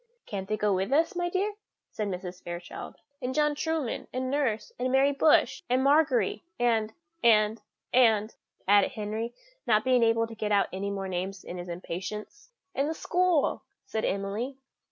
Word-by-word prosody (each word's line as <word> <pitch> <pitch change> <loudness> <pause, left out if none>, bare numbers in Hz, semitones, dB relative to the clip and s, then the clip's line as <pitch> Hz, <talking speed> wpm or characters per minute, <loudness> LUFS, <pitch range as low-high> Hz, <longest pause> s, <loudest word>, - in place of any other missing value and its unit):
"Can't 195 -2 -5
they 215 - 0
go 210 -1 +2
with 190 +5 -1
us, 325 +7 +3
my 350 0 0
dear?" 390 +4 0 0.4
said 215 - -3
Mrs. 180 -1 -5
Fairchild. 175 0 -7 0.3
"And 255 +1 -3
John 300 -1 +3
Trueman, 310 -4 -2
and 255 0 -2
nurse, 235 -7 -1
and 255 +1 0
Mary 270 +2 +4
Bush, 290 +2 +3
and 255 +1 +3
Margery, 275 -8 +3 0.2
and 225 -3 +2 0.3
and 220 -1 +4 0.3
and 225 -3 +4 0.2
" - - -40
added 205 +3 +5
Henry, 220 +1 -4 0.3
not 215 -2 +4
being 255 -1 +4
able 230 0 +3
to 225 - -9
get 215 -1 -3
out 200 -1 +3
any 195 +2 -2
more 195 -1 -3
names 185 +1 -4
in 180 - -7
his 175 0 -7
impatience. 190 - -6 0.2
"And 280 +2 0
the 320 - -2
school!" 355 -2 +1 0.2
said 220 - -3
Emily. 205 +7 -2
225 Hz, 175 wpm, -28 LUFS, 200-270 Hz, 0.4 s, added